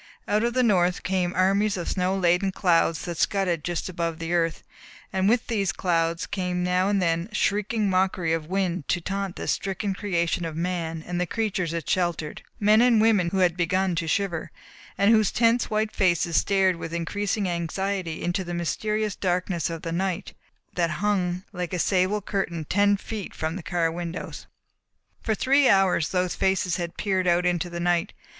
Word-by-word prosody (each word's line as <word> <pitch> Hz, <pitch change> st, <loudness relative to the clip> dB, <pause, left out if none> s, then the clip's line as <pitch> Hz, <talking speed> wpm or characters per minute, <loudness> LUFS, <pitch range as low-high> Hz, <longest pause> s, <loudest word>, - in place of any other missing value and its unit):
Out 210 Hz, +2 st, +1 dB
of 240 Hz, +1 st, 0 dB
the 255 Hz, -, +3 dB
North 180 Hz, -5 st, +2 dB
came 185 Hz, -2 st, 0 dB
armies 195 Hz, +2 st, +2 dB
of 175 Hz, -, -4 dB
snow 185 Hz, +1 st, 0 dB
laden 180 Hz, +1 st, +2 dB
clouds 170 Hz, -3 st, +2 dB
that 170 Hz, -2 st, -5 dB
scudded 180 Hz, -6 st, +1 dB
just 175 Hz, -1 st, -2 dB
above 170 Hz, -3 st, -3 dB
the 165 Hz, +1 st, -3 dB
earth, 165 Hz, -2 st, 0 dB, 0.5 s
and 190 Hz, +1 st, +2 dB
with 240 Hz, +1 st, +2 dB
these 205 Hz, -5 st, 0 dB
clouds 165 Hz, -2 st, 0 dB
came 180 Hz, -2 st, -2 dB
now 180 Hz, +2 st, +2 dB
and 205 Hz, -1 st, +2 dB
then 170 Hz, +1 st, 0 dB
a -, -, -8 dB
shrieking 210 Hz, +1 st, +1 dB
mockery 185 Hz, -3 st, +1 dB
of 160 Hz, -2 st, -2 dB
wind 185 Hz, -4 st, -1 dB
to 175 Hz, -, +1 dB
taunt 195 Hz, +1 st, -3 dB
this -, -, -2 dB
stricken 195 Hz, +1 st, -2 dB
creation 175 Hz, -4 st, -1 dB
of 165 Hz, -2 st, -4 dB
man 165 Hz, -2 st, -3 dB
and 175 Hz, 0 st, -2 dB
the 180 Hz, -, 0 dB
creatures 195 Hz, -6 st, -1 dB
it 170 Hz, -1 st, -4 dB
sheltered 175 Hz, -4 st, -1 dB, 0.2 s
men 215 Hz, +2 st, +5 dB
and 240 Hz, -2 st, +5 dB
women 215 Hz, -6 st, +3 dB
who 190 Hz, -, -2 dB
had 175 Hz, -2 st, 0 dB
begun 185 Hz, +2 st, +1 dB
to 165 Hz, -1 st, -2 dB
shiver, 175 Hz, -2 st, -1 dB, 0.5 s
and 200 Hz, +2 st, +4 dB
whose 215 Hz, -3 st, +4 dB
tense 230 Hz, +1 st, +2 dB
white 215 Hz, 0 st, 0 dB
faces 175 Hz, -3 st, +1 dB
stared 190 Hz, -1 st, +3 dB
with 165 Hz, 0 st, -5 dB
increasing 200 Hz, +4 st, -1 dB
anxiety 175 Hz, 0 st, -2 dB
into 175 Hz, +2 st, -1 dB
the 175 Hz, -1 st, -5 dB
mysterious 210 Hz, +4 st, -1 dB
darkness 180 Hz, -2 st, -1 dB
of 165 Hz, -1 st, -6 dB
the 165 Hz, -, -3 dB
night 185 Hz, +1 st, -2 dB, 0.4 s
that 170 Hz, -2 st, +1 dB, 0.2 s
hung 185 Hz, -3 st, 0 dB
like 180 Hz, -1 st, -4 dB
a -, -, 0 dB
sable 190 Hz, +3 st, +1 dB
curtain 170 Hz, -6 st, -2 dB
ten 205 Hz, +4 st, +3 dB
feet 210 Hz, -1 st, -7 dB
from 160 Hz, +1 st, -3 dB
the 190 Hz, -, -5 dB
car 170 Hz, -1 st, 0 dB
windows. 170 Hz, 0 st, -6 dB, 0.7 s
For 220 Hz, -, 0 dB
three 275 Hz, +4 st, +4 dB
hours 190 Hz, -5 st, +3 dB
those 180 Hz, -1 st, 0 dB
faces 185 Hz, -2 st, +1 dB
had 170 Hz, -1 st, -5 dB
peered 190 Hz, -3 st, 0 dB
out 175 Hz, +1 st, +3 dB
into 175 Hz, -1 st, 0 dB
the 170 Hz, 0 st, -5 dB
night. 175 Hz, +2 st, 0 dB
180 Hz, 185 wpm, -25 LUFS, 170-200 Hz, 0.7 s, men